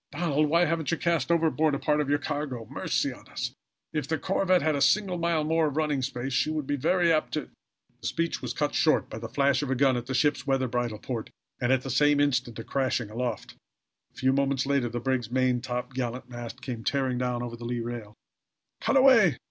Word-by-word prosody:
"Donald, 150 -1 +1
why 170 +3 +4
haven't 160 -2 -1
you 165 - +1
cast 170 -4 0
overboard 160 -3 +2
a - - -3
part 150 -1 +1
of 145 - -2
your 145 - +3
cargo! 145 -5 -4
Mercy - - -1
on - - -16
us! - - -4 0.4
If 150 -3 -2
the 160 - 0
corvette 185 +2 +1
had 155 -1 +2
a 140 - -1
single 190 -1 +2
mile 170 -2 +1
more 160 +1 +2
of 145 0 -4
running 150 -3 +1
space 130 0 -3
she 145 - +2
would 155 -2 -2
be 145 - -1
very 170 +4 +2
apt 155 - 0
to 150 - -3 0.2
" - - -42
The - - -3
speech 165 0 -1
was 125 - -3
cut 150 -1 0
short 155 0 +2
by 110 - -5
the 115 0 -6
flash 140 +2 +2
of 145 - -3
a 135 - +1
gun 135 0 +3
at 120 0 -4
the 130 - -2
ship's 145 +2 +1
weather 135 -1 +1
bridle 120 -2 -2
port 115 0 -5 0.3
and 120 +1 +1
at 130 -1 +2
the 135 - -4
same 145 +3 +4
instant 130 -5 +1
a 115 - -5
crashing 130 -4 -1
aloft. 120 -2 -3 0.6
A - - -38
few 130 0 +2
moments 140 -1 +1
later 140 -3 +1
the 120 +1 -3
brig's 125 -2 -1
main 130 -1 +1
top 125 +1 -4
gallant 125 -1 -3
mast 120 +1 -8
came 120 -4 -5
tearing 130 -2 0
down 125 -1 -1
over 120 -1 -5
the 120 0 -9
lee 120 0 -2
rail. 115 -3 -6 0.6
"Cut 275 - +2
away! 230 - +6
135 Hz, 235 wpm, -27 LUFS, 125-155 Hz, 0.6 s, away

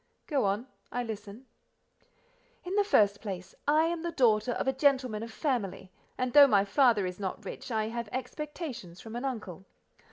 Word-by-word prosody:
"Go 280 -8 +1
on; 200 +5 0 0.3
I 245 - -1
listen." 215 +1 -7 1.2
"In 365 - -5
the 410 0 +4
first 205 - +3
place: 185 -4 -6
I 305 +2 +5
am 335 0 -1
the 340 - -2
daughter 240 -6 +3
of - - -2
a 265 - +3
gentleman 260 -5 +2
of 230 0 -6
family, 220 - -2 0.3
and 255 -1 -1
though 285 -1 +10
my 200 -5 +4
father 220 -1 +4
is 180 +1 -5
not 190 -2 -4
rich, - - -7
I 220 -2 0
have 235 -1 -4
expectations 255 - -6
from 225 +3 -9
an 245 +3 -3
uncle. 210 -9 -5
235 Hz, 180 wpm, -30 LUFS, 205-275 Hz, 1.2 s, though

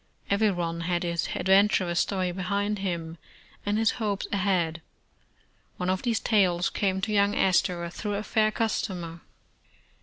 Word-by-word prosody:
Everyone 180 -5 +1
had 175 +1 -1
his 170 -1 -1
adventurous 190 -2 +3
story 185 -3 0
behind 200 +3 -1
him, 170 -4 -4 0.5
and 205 +1 +1
his 225 0 +3
hopes 205 -3 -1
ahead. 185 -5 0 1.0
One 180 0 0
of 185 - -1
these 235 -2 0
tales 180 -5 +2
came 190 -2 0
to 215 +2 -1
young 200 0 +3
Astor 180 -2 +2
through 205 +3 -3
a 205 - -3
fair 215 0 +2
customer. 180 -7 -3
190 Hz, 140 wpm, -27 LUFS, 175-205 Hz, 1.0 s, adventurous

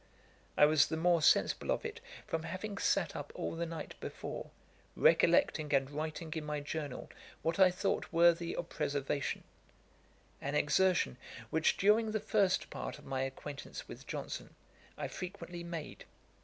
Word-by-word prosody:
I 150 - +8
was 150 -1 +5
the 160 - -2
more 170 0 +3
sensible 155 - +3
of - - 0
it - - -5 0.3
from 165 - -2
having 195 +5 -5
sat 175 -6 +1
up 145 - -5
all - - -3
the 170 +1 -2
night 165 -1 -6
before, - - -6 0.5
recollecting 150 -2 +4
and 135 0 +1
writing 155 +1 -4
in 160 - -3
my 150 0 -2
journal 145 -2 -5 0.3
what 165 +3 0
I 190 -1 +8
thought 185 +2 -1
worthy 170 0 +4
of 170 - -3
preservation; 140 -2 -2 1.0
an 140 +1 -2
exertion, 170 - +3 0.3
which, 160 0 +3
during 215 +2 +4
the 215 - +1
first 205 -3 +1
part - - -5
of 150 - -15
my 135 -1 -2
acquaintance 135 +2 -6
with - - -10
Johnson, - - -5 0.4
I - - -2
frequently 175 -2 -6
made. 170 -3 -6
165 Hz, 155 wpm, -34 LUFS, 150-180 Hz, 1.0 s, I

